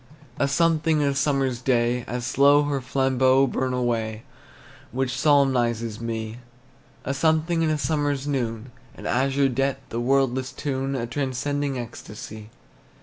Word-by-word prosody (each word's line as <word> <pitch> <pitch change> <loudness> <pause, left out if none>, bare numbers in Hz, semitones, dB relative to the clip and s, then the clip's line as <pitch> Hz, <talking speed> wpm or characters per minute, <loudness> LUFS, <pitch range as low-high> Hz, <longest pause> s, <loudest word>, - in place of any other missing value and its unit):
A 140 - +3
something 160 +1 +2
in 145 - +2
a - - 0
summer's 135 -3 0
day, 120 -1 +1
As 120 0 -3
slow 140 +4 +5
her 145 -2 -1
flambeaux 130 0 +3
burn 130 0 -1
away, 115 -3 -1 0.7
Which 130 0 -1
solemnizes 120 -6 +2
me. 115 0 -4 0.7
A 135 - -1
something 160 +3 +1
in 160 - +2
a 155 - +1
summer's 145 -1 -1
noon, 125 -4 -3 0.2
An - - -11
azure 135 +2 +2
depth, 135 0 -2
a 115 - -1
wordless 130 0 +1
tune, 135 -3 -2
Transcending 140 +1 -2
ecstasy. 110 -2 -8
135 Hz, 135 wpm, -24 LUFS, 120-140 Hz, 0.7 s, slow